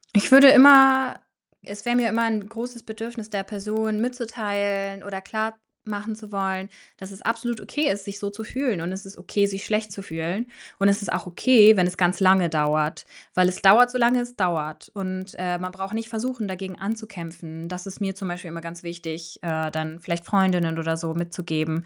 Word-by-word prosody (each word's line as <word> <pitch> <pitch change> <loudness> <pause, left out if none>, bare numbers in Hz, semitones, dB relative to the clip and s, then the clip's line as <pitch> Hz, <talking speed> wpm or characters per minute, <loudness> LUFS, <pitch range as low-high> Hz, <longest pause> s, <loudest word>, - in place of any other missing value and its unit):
Ich 205 +5 +3
würde 275 0 +11
immer 265 -1 +8 0.5
es 200 +1 -10
wäre 240 0 +1
mir 240 -2 +2
immer 230 +2 +1
'n 215 -2 -2
großes 235 +1 -7
Bedürfnis, 225 0 -8
der 200 -2 -3
Person 215 +1 -3
mitzuteilen 205 -5 -3
oder 195 -1 -6
klarmachen 220 0 -6
zu 215 -1 -13
wollen, 190 0 -3 0.3
dass 190 +1 -10
es 195 - -12
absolut 230 0 -2
okay 300 0 -2
ist, 195 0 -4
sich 200 0 -7
so 200 0 -4
zu 220 +2 -8
fühlen 245 -7 -2
und 175 +2 -4
es 195 +1 -7
ist 195 - -11
okay, 200 -1 0
sich 195 0 -4
schlecht 215 -1 -2
zu 195 - -7
fühlen 175 +7 -4 0.3
und 200 0 +4
es 200 +1 +1
ist - - -3
auch 185 - -3
okay, 215 +2 +6
wenn 180 - +4
es 180 0 -3
ganz 180 +1 +1
lange 185 -2 +4
dauert. 150 0 0 0.3
Weil 185 0 +4
es 185 - -3
dauert, 235 +6 +7
solange 245 0 +3
es 245 0 -7
dauert 160 -5 -2
und, 185 0 -5
äh, 180 -1 -2
man 185 0 -5
braucht 195 +2 -7
nicht 225 +1 -4
versuchen, 230 -1 -4
dagegen 190 0 -7
anzukämpfen. 175 -6 -7
Das 180 +1 -7
ist 195 +1 -10
mir 195 -1 -2
zum 195 -2 -6
Beispiel 175 0 -6
immer 165 0 -8
ganz 170 +1 -9
wichtig, 165 -1 -8
äh, 160 -1 -2
dann 155 +1 -5
vielleicht 170 0 -4
Freundinnen 180 -4 +1
oder 165 0 -1
so 165 -1 -4
mitzugeben, 170 -1 -3
195 Hz, 200 wpm, -24 LUFS, 175-220 Hz, 0.5 s, würde